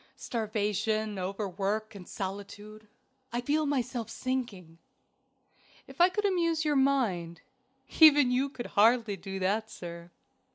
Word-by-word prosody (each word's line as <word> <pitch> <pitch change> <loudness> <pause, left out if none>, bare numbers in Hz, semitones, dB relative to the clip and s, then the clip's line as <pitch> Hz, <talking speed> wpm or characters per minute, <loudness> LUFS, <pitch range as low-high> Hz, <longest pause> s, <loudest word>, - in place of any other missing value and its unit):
"Starvation, 215 -3 -2
overwork, 200 +3 -3
and 190 -3 -11
solitude. 205 +2 -7 0.4
I 240 - -1
feel 295 +5 0
myself 250 -4 -2
sinking." 225 -12 -4 1.1
"If - - -5
I 355 - +7
could 415 +3 -2
amuse 335 -4 +1
your 300 -1 +1
mind." 220 - +1 0.6
"Even 290 -5 +7
you 260 +3 +1
could 245 -3 -7
hardly 225 0 +4
do 195 +1 -7
that, 205 +4 -1
sir." 170 -2 -9
220 Hz, 120 wpm, -29 LUFS, 195-265 Hz, 1.1 s, I